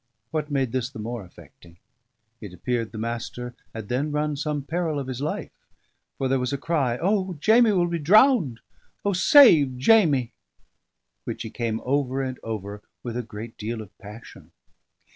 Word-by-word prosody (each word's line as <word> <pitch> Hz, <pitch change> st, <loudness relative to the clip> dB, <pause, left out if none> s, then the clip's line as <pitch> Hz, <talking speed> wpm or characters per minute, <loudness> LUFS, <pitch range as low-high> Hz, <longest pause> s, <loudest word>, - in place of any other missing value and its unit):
What 155 Hz, -2 st, -2 dB
made 135 Hz, -4 st, 0 dB
this 130 Hz, -1 st, -2 dB
the 135 Hz, -, -12 dB
more 115 Hz, 0 st, -5 dB
affecting: 85 Hz, -1 st, -17 dB, 0.6 s
it 100 Hz, -5 st, -9 dB
appeared 115 Hz, +5 st, -2 dB
the 110 Hz, -, -8 dB
Master 120 Hz, +2 st, -5 dB, 0.2 s
had 110 Hz, -2 st, -7 dB
then 135 Hz, +6 st, -1 dB
run 150 Hz, 0 st, -1 dB
some 145 Hz, 0 st, -3 dB
peril 160 Hz, 0 st, -2 dB
of 140 Hz, -, -3 dB
his 130 Hz, 0 st, -5 dB
life, 150 Hz, -, -3 dB, 0.7 s
for 135 Hz, -, -1 dB
there 135 Hz, 0 st, +1 dB
was 125 Hz, 0 st, -2 dB
a 140 Hz, -, -1 dB
cry 140 Hz, -5 st, 0 dB
"O! 190 Hz, +1 st, 0 dB
Jamie 220 Hz, +8 st, +4 dB
will 180 Hz, -2 st, +2 dB
be 170 Hz, -1 st, -2 dB
drowned 185 Hz, -, +4 dB, 0.4 s
O, 200 Hz, -, +2 dB
save 175 Hz, -, +6 dB
Jamie!" 145 Hz, -, +3 dB, 0.9 s
which -, -, -5 dB
he 110 Hz, -, -7 dB
came 115 Hz, -2 st, -2 dB
over 135 Hz, 0 st, 0 dB
and 130 Hz, -1 st, -5 dB
over 105 Hz, -2 st, -6 dB, 0.2 s
with 120 Hz, -2 st, -5 dB
a 125 Hz, -, -1 dB
great 110 Hz, 0 st, -9 dB
deal 110 Hz, +2 st, -4 dB
of 105 Hz, -4 st, -11 dB
passion. 105 Hz, +3 st, -12 dB
130 Hz, 170 wpm, -24 LUFS, 115-155 Hz, 0.9 s, save